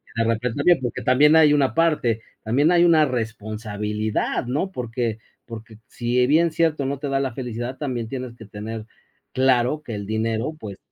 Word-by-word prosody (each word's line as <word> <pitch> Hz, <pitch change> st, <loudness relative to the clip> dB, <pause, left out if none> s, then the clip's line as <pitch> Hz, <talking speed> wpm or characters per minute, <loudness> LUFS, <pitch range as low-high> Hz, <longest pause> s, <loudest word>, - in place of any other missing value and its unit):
de 115 Hz, -, +1 dB
repente 115 Hz, +2 st, -1 dB
también 170 Hz, +2 st, +4 dB
Porque 125 Hz, -, -3 dB
también 145 Hz, +5 st, +5 dB
hay 155 Hz, -2 st, +6 dB
una 140 Hz, -3 st, +2 dB
parte. 150 Hz, -9 st, +1 dB, 0.2 s
También 140 Hz, +9 st, +2 dB
hay 175 Hz, 0 st, +5 dB
una 160 Hz, -3 st, +5 dB
responsabilidad, 110 Hz, -3 st, -3 dB
¿no? 150 Hz, +10 st, -2 dB
Porque 115 Hz, -, -3 dB, 0.3 s
porque, 115 Hz, -1 st, -10 dB
si 120 Hz, +1 st, 0 dB
bien 165 Hz, +4 st, +3 dB
cierto 155 Hz, -3 st, +1 dB
no 140 Hz, +1 st, -2 dB
te 145 Hz, -, -4 dB
da 135 Hz, 0 st, +1 dB
la 135 Hz, -4 st, -2 dB
felicidad, 125 Hz, 0 st, -5 dB
también 125 Hz, -6 st, -3 dB
tienes 125 Hz, -2 st, -6 dB
que 110 Hz, -, -11 dB
tener 110 Hz, +2 st, -7 dB, 0.5 s
claro 130 Hz, +2 st, +2 dB
que 115 Hz, -, -6 dB
el 100 Hz, -1 st, -5 dB
dinero, 110 Hz, +6 st, -1 dB
pues 100 Hz, -3 st, -8 dB
125 Hz, 175 wpm, -23 LUFS, 110-145 Hz, 0.5 s, hay